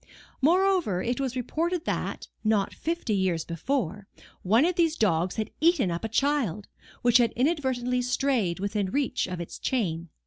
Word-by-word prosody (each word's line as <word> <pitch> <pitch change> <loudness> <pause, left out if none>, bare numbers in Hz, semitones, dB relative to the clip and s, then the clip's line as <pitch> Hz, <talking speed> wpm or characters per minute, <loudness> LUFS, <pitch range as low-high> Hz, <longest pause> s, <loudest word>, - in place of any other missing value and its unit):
Moreover, 350 - +3
it 245 +2 -1
was 265 -2 -2
reported 330 +7 -2
that, - - -3 0.2
not 215 -3 +1
fifty 330 -9 -2
years 185 -5 0
before, 200 - -2 0.3
one 225 - +4
of 360 - +2
these 330 -2 +2
dogs 175 -3 +1
had 220 -1 -3
eaten 310 - +3
up 170 +3 -4
a 225 - -2
child, 225 - 0 0.4
which 240 0 +5
had 235 -2 +3
inadvertently 255 -3 0
strayed 245 -7 0
within 200 0 -1
reach 265 +2 0
of 180 -1 -5
its 170 - -7
chain. 170 -9 -1
240 Hz, 160 wpm, -27 LUFS, 190-280 Hz, 0.4 s, which